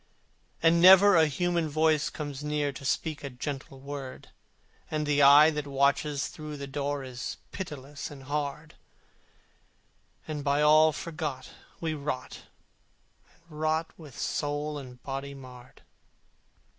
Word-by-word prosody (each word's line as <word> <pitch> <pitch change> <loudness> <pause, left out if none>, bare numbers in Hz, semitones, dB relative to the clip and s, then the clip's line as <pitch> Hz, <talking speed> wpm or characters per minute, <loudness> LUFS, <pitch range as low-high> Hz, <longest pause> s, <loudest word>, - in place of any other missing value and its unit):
And 165 +1 +5
never 190 +2 +8
a 160 -1 +5
human 170 +2 0
voice 155 0 +2
comes 145 -2 -6
near 150 -1 -1
To 140 +1 -11
speak 150 +3 -2
a 140 - -4
gentle 135 +1 -6
word: 140 -1 -8 0.6
And 155 -1 -1
the 145 -1 +2
eye 145 +3 +8
that 150 -2 -4
watches 140 +1 +1
through 150 -1 -8
the 140 - -6
door 140 0 -3
Is 130 -1 -6
pitiless 145 -6 -7
and 140 -2 -11
hard: 145 +2 -4 1.5
And 150 -2 -4
by 145 +1 +2
all 155 +1 +6
forgot, 155 -5 -5 0.3
we 160 -2 -2
rot 140 -3 -5 1.0
and 155 -2 -12
rot, 155 +1 0
With 150 -6 -13
soul 145 0 -2
and 125 -2 -11
body 140 +1 -5
marred. 125 -2 -13
145 Hz, 130 wpm, -28 LUFS, 140-155 Hz, 1.5 s, never